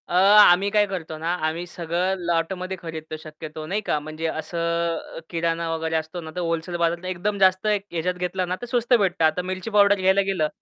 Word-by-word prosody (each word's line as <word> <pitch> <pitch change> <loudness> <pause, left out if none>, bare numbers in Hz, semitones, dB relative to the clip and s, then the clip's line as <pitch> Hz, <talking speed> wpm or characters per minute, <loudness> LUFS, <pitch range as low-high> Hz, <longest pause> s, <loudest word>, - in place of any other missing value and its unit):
अ, - - -5
आम्ही 195 0 +6
काय 210 0 +3
करतो 165 -5 -5
ना 165 +2 -1
आम्ही 165 +2 -3
सगळं 175 +2 -1
लॉटमध्ये 180 +3 -1
खरीदतो 160 -1 -6
शक्यतो 155 0 -9
नाही 200 +6 -2
का, 155 - -1
म्हणजे 155 +2 -6
असं 160 +2 -5 0.6
अ, - - -4
किराणा 165 0 -1
वगैरे 160 0 -2
असतो 160 +3 -3
ना 160 -1 -8
तर - - -3
होलसेल 165 +1 -2
बाजारातला 170 +1 0
एकदम 185 +3 -2
जास्त 190 +1 +3
याच्यात 180 -4 -1
घेतलं 180 +1 -2
ना 180 - -1
तर - - -4
स्वस्त 245 0 0
भेटतं 190 -8 +3
आता 160 +3 +2
मिरची 185 +3 -5
पावडर 205 -1 +5
घ्यायला 190 +1 +4
गेलं, 190 -6 0
175 Hz, 200 wpm, -24 LUFS, 165-190 Hz, 0.6 s, आम्ही